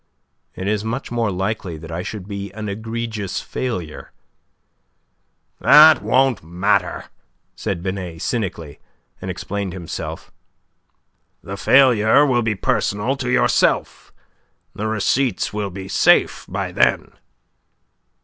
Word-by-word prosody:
"It 95 Hz, -, -5 dB
is 105 Hz, 0 st, 0 dB
much 120 Hz, +4 st, -4 dB
more 115 Hz, -2 st, 0 dB
likely 95 Hz, -2 st, -3 dB
that 80 Hz, +1 st, -10 dB
I 85 Hz, +2 st, -3 dB
should 100 Hz, 0 st, -7 dB
be 100 Hz, -1 st, -6 dB
an 110 Hz, 0 st, -6 dB
egregious 110 Hz, -1 st, -4 dB
failure." 90 Hz, -12 st, -5 dB, 1.5 s
"That 155 Hz, +1 st, +8 dB
won't 130 Hz, -6 st, +2 dB
matter," 90 Hz, +2 st, 0 dB, 0.5 s
said 85 Hz, -, -4 dB
Binet, 95 Hz, -3 st, -5 dB
cynically, 90 Hz, -10 st, -3 dB, 0.4 s
and -, -, -5 dB
explained 100 Hz, -2 st, -4 dB
himself. 85 Hz, -3 st, -7 dB, 1.1 s
"The 100 Hz, -, -6 dB
failure 125 Hz, +2 st, +5 dB
will 125 Hz, -4 st, +2 dB
be 110 Hz, -2 st, -1 dB
personal 105 Hz, +6 st, 0 dB
to 125 Hz, -2 st, -3 dB
yourself. 125 Hz, -, +1 dB, 0.6 s
The 110 Hz, -, -3 dB
receipts 110 Hz, +4 st, 0 dB
will 105 Hz, -1 st, -2 dB
be 95 Hz, +1 st, -8 dB
safe -, -, +3 dB
by -, -, -3 dB
then." -, -, +1 dB
105 Hz, 115 wpm, -20 LUFS, 95-115 Hz, 1.5 s, That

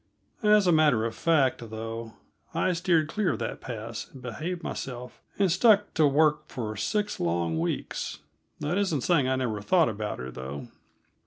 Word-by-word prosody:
As 210 Hz, -2 st, +5 dB
a 180 Hz, -, +5 dB
matter 150 Hz, -8 st, +4 dB
of 115 Hz, -, -2 dB
fact, 135 Hz, -5 st, +1 dB
though, 115 Hz, +1 st, -6 dB, 0.4 s
I 185 Hz, -, +2 dB
steered 165 Hz, -2 st, +2 dB
clear 200 Hz, +3 st, 0 dB
of -, -, -3 dB
that -, -, -4 dB
pass, 115 Hz, -2 st, -6 dB
and 135 Hz, -, -12 dB
behaved 155 Hz, +9 st, -5 dB
myself 125 Hz, -1 st, -6 dB, 0.2 s
and 195 Hz, -3 st, +3 dB
stuck 205 Hz, +3 st, +4 dB
to 155 Hz, -3 st, +4 dB
work 150 Hz, +1 st, +3 dB
for 110 Hz, -4 st, -4 dB
six 205 Hz, -, -1 dB
long 85 Hz, -1 st, 0 dB
weeks; 85 Hz, -, -3 dB, 0.4 s
that 150 Hz, +6 st, 0 dB
isn't 180 Hz, -9 st, 0 dB
saying 145 Hz, -3 st, +3 dB
I 130 Hz, -, +2 dB
never 115 Hz, -5 st, -2 dB
thought 170 Hz, -, +3 dB
about 105 Hz, -1 st, -4 dB
her, 65 Hz, +1 st, -6 dB
though. 65 Hz, +3 st, -7 dB
135 Hz, 170 wpm, -27 LUFS, 110-175 Hz, 0.4 s, As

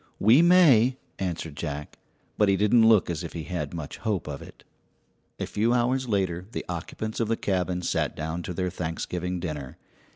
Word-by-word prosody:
"We 115 Hz, +9 st, +6 dB
may," 145 Hz, -9 st, +6 dB, 0.2 s
answered 85 Hz, -5 st, -3 dB
Jack; 75 Hz, 0 st, -6 dB, 0.4 s
but 105 Hz, -2 st, +3 dB
he 100 Hz, -, +3 dB
didn't 110 Hz, +3 st, +5 dB
look 110 Hz, -4 st, +5 dB
as 85 Hz, -1 st, -3 dB
if 85 Hz, -, -7 dB
he 80 Hz, -, -5 dB
had 85 Hz, +4 st, -4 dB
much 80 Hz, -4 st, -6 dB
hope 105 Hz, -8 st, -2 dB
of 70 Hz, -2 st, -5 dB
it. -, -, -13 dB, 0.8 s
A -, -, -1 dB
few 115 Hz, +3 st, +1 dB
hours 125 Hz, +1 st, +1 dB
later 95 Hz, -3 st, -1 dB
the -, -, -4 dB
occupants 90 Hz, +5 st, -5 dB
of 115 Hz, -, +1 dB
the 115 Hz, +1 st, 0 dB
cabin 90 Hz, -2 st, -1 dB
sat -, -, -1 dB
down 80 Hz, +2 st, -3 dB
to 90 Hz, -, -5 dB
their 90 Hz, 0 st, -1 dB
Thanksgiving 90 Hz, +2 st, -3 dB
dinner. 75 Hz, -6 st, -5 dB
90 Hz, 185 wpm, -26 LUFS, 85-110 Hz, 0.8 s, We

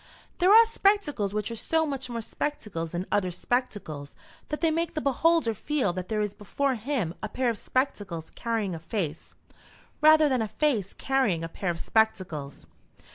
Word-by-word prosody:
There 365 Hz, +1 st, +4 dB
are 455 Hz, +2 st, +9 dB
spectacles 395 Hz, -, +1 dB
which 210 Hz, +2 st, -2 dB
are -, -, -4 dB
so 320 Hz, +7 st, +1 dB
much 270 Hz, -4 st, -4 dB
more 230 Hz, -1 st, -4 dB
spectacles 210 Hz, -, -4 dB
than 175 Hz, +2 st, -2 dB
other 200 Hz, -3 st, +2 dB
spectacles 180 Hz, -, -3 dB, 0.3 s
that 300 Hz, -, -2 dB
they 325 Hz, -2 st, +3 dB
make 330 Hz, +1 st, -1 dB
the -, -, 0 dB
beholder 300 Hz, -2 st, +2 dB
feel 250 Hz, -3 st, -1 dB
that 185 Hz, 0 st, -5 dB
there 215 Hz, -1 st, 0 dB
is 205 Hz, -1 st, -3 dB
before 270 Hz, +7 st, -1 dB
him 230 Hz, -, -2 dB
a 215 Hz, -, -4 dB
pair 250 Hz, +1 st, 0 dB
of 225 Hz, -, -6 dB
spectacles 200 Hz, -, -2 dB
carrying 225 Hz, -5 st, -2 dB
a 165 Hz, -, -5 dB
face, 165 Hz, -2 st, -4 dB, 0.7 s
rather 310 Hz, 0 st, +7 dB
than 260 Hz, -4 st, +1 dB
a 220 Hz, -, -1 dB
face 220 Hz, -7 st, 0 dB
carrying 260 Hz, -12 st, +1 dB
a -, -, -2 dB
pair 180 Hz, +3 st, -4 dB
of 170 Hz, -1 st, -2 dB
spectacles. 180 Hz, -, 0 dB
225 Hz, 180 wpm, -27 LUFS, 185-290 Hz, 0.7 s, are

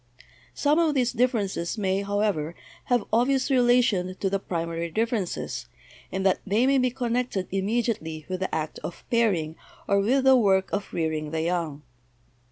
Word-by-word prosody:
Some 295 Hz, +2 st, +2 dB
of 320 Hz, -3 st, +2 dB
these 250 Hz, -2 st, +1 dB
differences 225 Hz, -7 st, 0 dB
may, 195 Hz, -1 st, 0 dB
however, 200 Hz, -6 st, -1 dB, 0.3 s
have 245 Hz, -3 st, +2 dB
obvious 260 Hz, +4 st, +2 dB
relation 240 Hz, -8 st, +3 dB
to 195 Hz, 0 st, -2 dB
the 195 Hz, -, +1 dB
primary 170 Hz, -2 st, -3 dB
differences, 220 Hz, -1 st, -2 dB, 0.4 s
in 190 Hz, +1 st, -2 dB
that 190 Hz, -1 st, +3 dB
they 215 Hz, +5 st, +2 dB
may 270 Hz, 0 st, +4 dB
be 255 Hz, 0 st, +2 dB
connected 245 Hz, -5 st, -2 dB
immediately 195 Hz, -6 st, -1 dB
with 185 Hz, -1 st, -3 dB
the 190 Hz, -, -2 dB
act 155 Hz, -1 st, -3 dB
of 170 Hz, -, -8 dB
pairing 185 Hz, -10 st, +1 dB, 0.3 s
or 200 Hz, -, +3 dB
with 255 Hz, +7 st, +2 dB
the 265 Hz, 0 st, +7 dB
work 195 Hz, -5 st, +2 dB
of 200 Hz, 0 st, -2 dB
rearing 155 Hz, -2 st, -2 dB
the 160 Hz, +1 st, -2 dB
young. 165 Hz, -4 st, -2 dB
200 Hz, 160 wpm, -26 LUFS, 175-245 Hz, 0.4 s, the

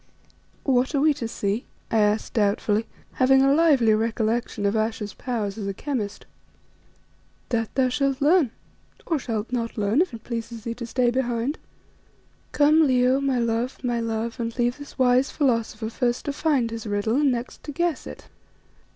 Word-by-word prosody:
"What 260 Hz, +1 st, +1 dB
are -, -, +3 dB
we 305 Hz, +1 st, +4 dB
to 255 Hz, -5 st, -4 dB
see?" 210 Hz, +1 st, -2 dB, 0.2 s
I 225 Hz, -, +3 dB
asked 210 Hz, +1 st, +1 dB
doubtfully, 210 Hz, +1 st, +1 dB, 0.3 s
having 265 Hz, +1 st, +6 dB
a 275 Hz, 0 st, +4 dB
lively 285 Hz, -8 st, +4 dB
recollection 225 Hz, -1 st, -1 dB
of 200 Hz, +2 st, +1 dB
Ayesha's 220 Hz, -2 st, -2 dB
powers 220 Hz, -5 st, -3 dB
as 200 Hz, -, -4 dB
a 195 Hz, -, -3 dB
chemist. 225 Hz, -8 st, -4 dB, 1.2 s
"That 225 Hz, -3 st, 0 dB
thou 260 Hz, -1 st, +3 dB
shalt 275 Hz, +1 st, 0 dB
learn, 305 Hz, -1 st, +4 dB, 0.6 s
or 325 Hz, -4 st, 0 dB
shalt 225 Hz, -3 st, -4 dB
not 235 Hz, -2 st, -2 dB
learn 210 Hz, +7 st, +2 dB
if 370 Hz, -, 0 dB
it 230 Hz, -2 st, -9 dB
pleases 230 Hz, -1 st, -5 dB
thee 230 Hz, -, -3 dB
to 235 Hz, 0 st, -7 dB
stay 245 Hz, 0 st, +1 dB
behind. 245 Hz, +2 st, -1 dB, 0.9 s
Come, 305 Hz, +1 st, +4 dB
Leo, 255 Hz, +1 st, +3 dB
my 270 Hz, -2 st, +1 dB
love, 235 Hz, +2 st, -1 dB
my 240 Hz, -1 st, 0 dB
love, 230 Hz, +1 st, -3 dB
and 230 Hz, 0 st, -3 dB
leave 245 Hz, +2 st, 0 dB
this 285 Hz, -, -11 dB
wise 255 Hz, 0 st, +3 dB
philosopher 230 Hz, -5 st, -1 dB
first 240 Hz, 0 st, -1 dB
to 285 Hz, -, -2 dB
find 280 Hz, -7 st, +1 dB
his 225 Hz, -1 st, -6 dB
riddle 205 Hz, +4 st, 0 dB
and 290 Hz, -2 st, +3 dB
next 240 Hz, 0 st, -4 dB
to 295 Hz, -, -5 dB
guess 340 Hz, 0 st, -1 dB
it." -, -, -10 dB
240 Hz, 170 wpm, -24 LUFS, 225-270 Hz, 1.2 s, having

